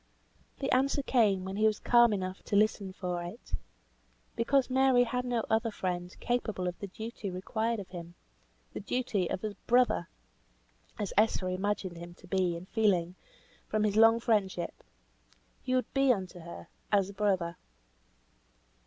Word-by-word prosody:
The 275 - -2
answer 275 +2 +2
came 205 -8 +2
when 190 +1 -4
he 215 +1 +4
was 215 - +1
calm 240 -1 +5
enough 185 -2 -3
to - - -1
listen 205 -2 +2
for 180 -2 -3
it. 175 - -10 0.8
Because 260 +3 +2
Mary 260 -1 +4
had 250 +1 -2
no 240 -2 0
other 225 +1 +1
friend 180 -3 -4
capable 220 -7 -1
of 180 - -4
the 200 - -5
duty 220 +1 -6
required 220 +5 -2
of 195 - -8
him; 175 -1 -9 0.6
the - - -4
duty 205 -5 -1
of 185 - -3
a 210 -1 -3
brother, 245 -8 +3 0.9
as 205 -3 -3
Esther 210 -3 +3
imagined 185 -1 -2
him 175 +1 -9
to 185 - -17
be 185 -1 0
in 170 +2 -7
feeling, 185 -5 +1 0.5
from 215 0 0
his 210 -1 +1
long 225 +1 +6
friendship. 195 -7 0 0.9
He 255 0 -1
would 255 - -1
be 270 -1 +4
unto 185 -5 -2
her 170 0 -9 0.2
as 200 -2 +3
a - - -14
brother. 190 -4 0
205 Hz, 160 wpm, -30 LUFS, 185-230 Hz, 0.9 s, long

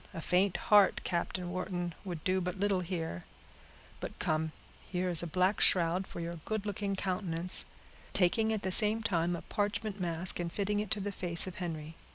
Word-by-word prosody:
A - - -5
faint 185 +3 +1
heart, 205 -2 +4
Captain 175 0 -3
Wharton, 175 -1 -4
would 175 -5 -7
do 185 0 0
but 180 +1 -4
little 200 -1 +1
here; 165 - -4 0.8
but - - -7
come, 155 0 -1 0.4
here 180 0 -1
is 170 - +8
a 170 - -4
black 185 +4 0
shroud 180 +1 +4
for - - -9
your 170 0 -5
good 210 +6 -5
looking 200 -1 -3
countenance," 180 -2 +1 0.5
taking, 220 +5 +1
at 215 -2 -3
the 190 - -2
same 215 +3 +7
time, 175 -5 0
a 170 - -8
parchment 205 0 -3
mask, 175 +1 0
and 170 -1 -3
fitting 205 +2 -1
it 210 -1 -4
to 215 - -1
the 200 +1 -4
face 175 -3 0
of 185 -2 -8
Henry. 160 -3 -6
185 Hz, 190 wpm, -31 LUFS, 170-200 Hz, 0.8 s, is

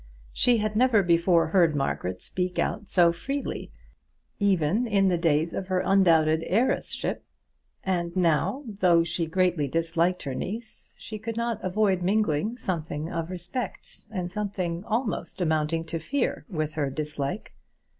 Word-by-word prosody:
She 245 -1 +4
had 215 -1 -1
never 230 -3 +4
before 170 -1 +3
heard 170 -3 +4
Margaret 95 -10 -2
speak 180 0 -3
out 210 -3 -1
so 175 -2 +5
freely, 275 +12 -4 0.7
even 200 +3 +2
in 200 -3 +3
the 180 - +2
days 165 0 +2
of 185 - -4
her 185 -1 0
undoubted 165 -5 +4
heiress 225 +8 +1
ship; - - -3 0.6
and 175 -2 -1
now, 185 - +1 0.2
though 175 -3 +5
she 165 0 -2
greatly 175 -3 +1
disliked 165 +4 0
her 135 - -3
niece, 215 - -6
she 215 -1 -7
could 225 +1 -5
not 235 -2 -2
avoid 190 0 +1
mingling 205 +2 +1
something 160 -5 -3
of 165 0 -3
respect 185 +7 -6
and 180 -5 -4
something 185 -4 -3
almost 220 -8 -2
amounting 160 -1 +1
to 165 0 -3
fear 270 - -2
with 155 -5 -2
her 145 -3 -1
dislike. 150 +4 -4
180 Hz, 145 wpm, -26 LUFS, 160-210 Hz, 0.7 s, so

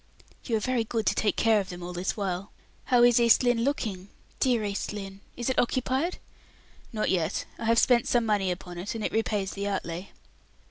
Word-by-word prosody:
"You 230 -3 +1
are - - -3
very 255 0 0
good 225 -1 -2
to - - +3
take 210 - +1
care 225 -2 +4
of 195 - -4
them 175 -1 -7
all 180 +1 -6
this 180 +4 -2
while. 195 -1 -3 0.3
How 245 -1 +4
is 240 -1 +6
East 235 +1 +5
Lynne 245 -2 +2
looking? 210 -9 -2 0.3
Dear 245 -4 +2
East 200 -1 -3
Lynne! 195 -1 -7 0.2
Is 240 - -3
it 260 - +1
occupied?" 260 +7 0 0.7
"Not 215 -3 -1
yet. 170 -1 0
I 230 - -4
have 230 +1 +3
spent 240 0 +4
some 240 -2 +2
money 205 -3 +1
upon 180 -1 -5
it, 195 +5 -4
and 220 - -4
it - - -1
repays 210 -3 0
the 200 0 -4
outlay." 185 -2 -4
215 Hz, 205 wpm, -27 LUFS, 195-240 Hz, 0.7 s, is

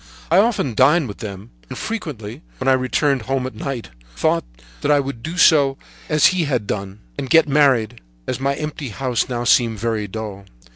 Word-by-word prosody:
I 170 - +5
often 205 - +1
dined 145 +6 +4
with 100 - -9
them, 100 - -8 0.2
and - - -7
frequently, 140 - -5 0.2
when 130 - -4
I - - +6
returned 130 +1 +1
home 130 +2 -2
at 130 - -5
night, 135 - -5 0.2
thought - - +1 0.4
that - - -1
I 145 - +5
would 135 -4 -4
do 160 +7 -5 0.7
as 150 -1 +3
he 180 -2 +4
had 125 -7 -1
done, 100 0 -5 0.2
and 130 - -4
get 165 -1 +5
married, 130 -6 +2 0.2
as 125 - -3
my 140 +1 0
empty 150 -2 -5
house 125 +1 -1
now 120 -1 -2
seemed 115 -2 +3
very 110 -1 -2
dull. 100 -1 -7
130 Hz, 185 wpm, -20 LUFS, 110-145 Hz, 0.7 s, I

